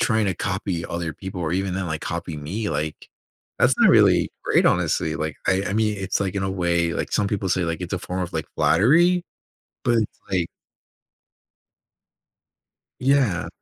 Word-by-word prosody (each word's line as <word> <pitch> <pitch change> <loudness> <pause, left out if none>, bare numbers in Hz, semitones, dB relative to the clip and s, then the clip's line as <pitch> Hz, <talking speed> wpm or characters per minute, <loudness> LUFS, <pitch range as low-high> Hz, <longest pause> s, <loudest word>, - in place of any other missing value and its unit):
trying 110 -2 +2
to 95 - 0
copy 90 -1 -3
other 85 -2 -3
people 95 +3 -7
or 80 0 -1
even 95 0 -1
then, 95 -1 -2
like, 80 -1 -3
copy 85 -1 -4
me. 95 +9 -3
Like, 75 +1 -4 0.5
that's - - +4
not - - +6
really - - +5
great, - - +3
honestly. 80 - +1
Like, 80 -2 -3
I 95 +1 +2
I - - -2
mean, 110 -1 +1
it's, 95 0 -1
in 100 0 -1
a 95 - -1
way, 85 -2 +1
like, - - -3
some 105 - +2
people 100 -2 -2
say, 90 0 +1
like, 85 -1 -2
it's 90 - -6
a 95 - 0
form 90 +1 -4
of, 90 0 -4
like, 80 -1 -3
flattery, 145 - +4 0.6
but, 120 -1 +3 0.3
like 90 -3 0 2.5
Yeah. 130 -8 +2
95 Hz, 170 wpm, -23 LUFS, 85-100 Hz, 2.5 s, not